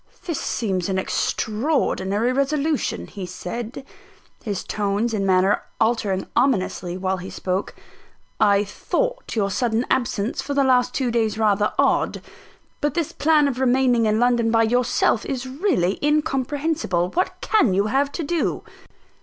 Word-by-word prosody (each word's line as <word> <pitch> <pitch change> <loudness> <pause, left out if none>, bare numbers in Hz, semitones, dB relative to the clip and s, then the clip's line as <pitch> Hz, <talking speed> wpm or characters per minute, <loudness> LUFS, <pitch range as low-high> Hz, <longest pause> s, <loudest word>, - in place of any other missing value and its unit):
"This 335 -5 -2
seems 190 -5 -1
an 190 - 0
extraordinary 220 +1 0
resolution," 285 +2 0
he 195 -3 -7
said, 230 +8 -6 0.6
his 205 -6 -3
tones 210 +3 -1
and 200 -2 0
manner 190 +2 +3 0.2
altering 215 -4 +1
ominously 190 -8 0
while 190 0 -1
he 185 +1 -7
spoke. 185 +2 -3 0.6
"I 205 -1 +4
thought - - -3
your 200 -3 0
sudden 235 +2 0
absence 240 -3 0
for 285 - -4
the 280 - +3
last 250 -1 +2
two 255 -3 0
days 220 -2 0
rather 210 -1 +2
odd; - - +1 0.6
but 295 +1 0
this 335 -4 -1
plan 305 -1 +3
of 260 -2 -3
remaining 250 -3 +3
in 215 +1 +2
London 240 -1 +2
by 225 0 +3
yourself 240 -1 +2
is 265 -2 -4
really 260 - 0
incomprehensible. 290 - 0
What 365 - -1
can 275 - +3
you 200 +1 +2
have 275 +6 +1
to 335 - -3
do?" 335 +2 -1
235 Hz, 145 wpm, -22 LUFS, 200-275 Hz, 0.6 s, I